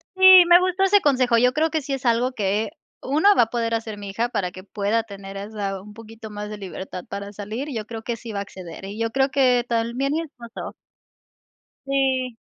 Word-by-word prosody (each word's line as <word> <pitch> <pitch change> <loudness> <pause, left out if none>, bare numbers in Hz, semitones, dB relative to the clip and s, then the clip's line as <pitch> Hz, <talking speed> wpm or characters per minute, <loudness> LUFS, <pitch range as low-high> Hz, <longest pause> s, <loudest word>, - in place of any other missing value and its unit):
Sí, 375 -1 +9
me 350 0 +8
gustó 370 +1 0
ese 400 +1 +5
consejo, 255 -4 +3
yo 250 +2 +4
creo 315 +2 +1
que 315 -1 -1
sí 275 0 -4
es 270 -1 -4
algo 240 +2 +2
que, 210 +1 -1 0.3
1 310 +9 +3
va - - +7
a 225 - -4
poder 230 -1 -1
hacer 220 -2 -5
mi 200 -1 -7
hija 225 +5 -1
para 200 -7 -2
que 185 +1 -12
pueda 210 +3 -1
tener 195 -2 -9
esa 200 -2 -4
un 210 +1 -13
poquito 225 0 -11
más 210 0 -6
de 210 - -6
libertad 190 -2 -7
para 200 0 -6
salir. 215 +8 -5
Yo 215 -2 -4
creo 225 -1 -6
que 230 0 -4
sí 225 -1 -8
va 200 - -2
a - - -2
acceder, 185 -3 -9
y 205 +3 -7
yo 230 0 0
creo 270 +1 +2
que 250 -3 +3
también 235 +4 0
mi 315 - 0
esposo. 245 -7 -9 1.1
Sí, 260 -3 0
230 Hz, 220 wpm, -23 LUFS, 205-270 Hz, 1.1 s, Sí